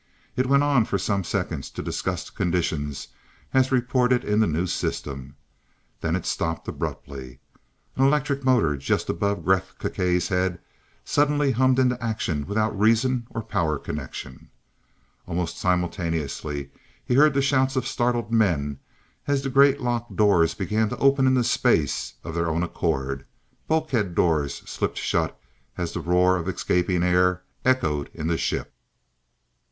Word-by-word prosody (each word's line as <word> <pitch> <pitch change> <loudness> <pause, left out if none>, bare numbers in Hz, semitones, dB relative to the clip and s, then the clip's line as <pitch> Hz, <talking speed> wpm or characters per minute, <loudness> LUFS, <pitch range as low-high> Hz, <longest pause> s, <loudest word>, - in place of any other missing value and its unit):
It 130 0 +1
went 140 +1 +4
on 140 -6 +3
for 100 - -1
some 100 +1 -1
seconds - - -3
to - - -6
discuss - - -3
the - - -16
conditions 80 -5 -1 0.4
as 130 0 +3
reported 125 0 +2
in 105 +1 +1
the 110 - +4
new 80 +3 0
system. 70 -6 -4 0.6
Then - - -1
it - - -3
stopped 80 -1 -2
abruptly. 65 -3 -6 0.6
An 135 - +3
electric 140 -1 +1
motor 120 - +3
just 70 - 0
above 100 +4 -1
Gresth 95 -1 +1
Gkae's 90 -1 0
head 90 -1 0 0.5
suddenly 145 -1 +2
hummed 130 +1 +3
into 125 -2 +2
action 100 -10 -2
without 110 +2 0
reason 115 +3 +2
or 115 - -5
power 85 -9 0
connection. 65 -3 -7 0.8
Almost 90 -1 -3
simultaneously 80 -6 -2 0.3
he - - 0
heard 145 +2 +5
the 140 - +3
shouts 135 -1 +2
of 130 -2 0
startled 120 -3 -1
men 75 -11 +1 0.5
as 140 -1 +1
the 135 - -2
great 140 +1 +5
lock 120 -1 -2
doors 100 -7 +4
began 105 +3 0
to - - -4
open 135 -1 +4
into 130 -1 +3
space - - +1
of 80 - -6
their 85 0 0
own 80 +2 0
accord, 70 -5 -2 0.4
bulkhead 135 - 0
doors 80 -5 0
slipped - - -3
shut - - -1 0.4
as 85 -2 -2
the - - -3
roar 90 +2 +3
of 85 0 -4
escaping 90 -1 0
air 90 0 +2 0.2
echoed 75 - +1
in 75 - -5
the 80 0 +1
ship. - - -2
100 Hz, 150 wpm, -24 LUFS, 85-130 Hz, 0.8 s, heard